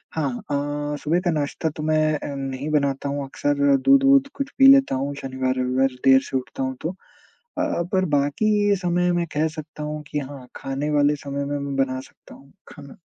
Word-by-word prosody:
हाँ 150 -3 0
अ, 145 +1 -3
सुबह 165 +4 +2
का 175 - +3
नाश्ता 150 +1 -2
तो 150 - -4
मैं 155 0 +2
अ, 145 - -5
नहीं 135 +1 -4
बनाता 140 -1 0
हूँ 140 0 -2
अक्सर 140 +1 +1
दूध-वूध 275 0 +5
कुछ 275 -1 -4
पी 270 - +8
लेता 275 - +3
हूँ। 140 +2 -2
शनिवार-रविवार 130 0 0
देर 135 0 +7
से 135 - 0
उठता 130 +1 -5
हूँ 130 0 -2
तो, 175 +4 -3 0.6
अ - - +2
अ, 170 - -1
पर 185 0 +2
बाकी 145 +10 +1 0.2
ये 200 - +4
समय 180 -1 +1
मैं 175 0 0
कह 150 +2 +1
सकता 155 0 -7
हूँ 150 0 -4
कि 150 +2 -2
हाँ 135 -2 -9
खाने 135 +2 -3
वाले 145 0 +3
समय 140 0 -5
में 145 0 -3
मैं 140 -1 -4
बना 130 0 -4
सकता - - -17
हूँ 135 0 -18 0.2
खाना। 140 -2 -12
145 Hz, 200 wpm, -23 LUFS, 135-155 Hz, 0.6 s, पी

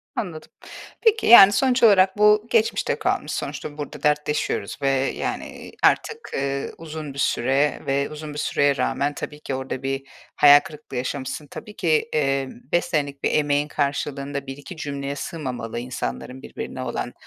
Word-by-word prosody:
Anladım. 170 -7 -5 0.5
Peki, 450 -1 +3
yani, 200 -4 +10
sonuç 255 +4 +2
olarak 195 -3 +5
bu 210 +1 +5
geçmişte 225 -2 +1
kalmış. - - -1
Sonuçta 145 - -5
burada 145 -1 -7
dertleşiyoruz 150 0 0
ve, 135 - +2 0.3
yani, - - -3
eee, - - -11
artık, 450 +1 +1
ııı, 140 0 -2
uzun 155 -3 -7
bir 140 - -8
süre 135 +3 +1
ve 140 +1 0
uzun 150 0 -8
bir 145 - -5
süreye 145 -1 +1
rağmen, 140 +3 0
tabii 150 0 -7
ki 135 - -4
orada 130 0 -5
bir 135 0 -3 0.3
hayal 145 0 +8
kırıklığı 150 -3 -9
yaşamışsın. 135 +3 -4
Tabii 210 +8 -10
ki, 160 +3 +1
eee, 135 -2 +1 0.2
5 175 0 +2
senelik 145 -5 -2
bir - - +2
emeğin 145 0 +1
karşılığında 140 -1 -3
1-2 140 +6 -8
cümleye 140 -1 -4
sığmamalı 125 -8 -5
insanların 125 - -5
birbirine - - -7
olan - - -4
145 Hz, 155 wpm, -23 LUFS, 135-160 Hz, 0.5 s, yani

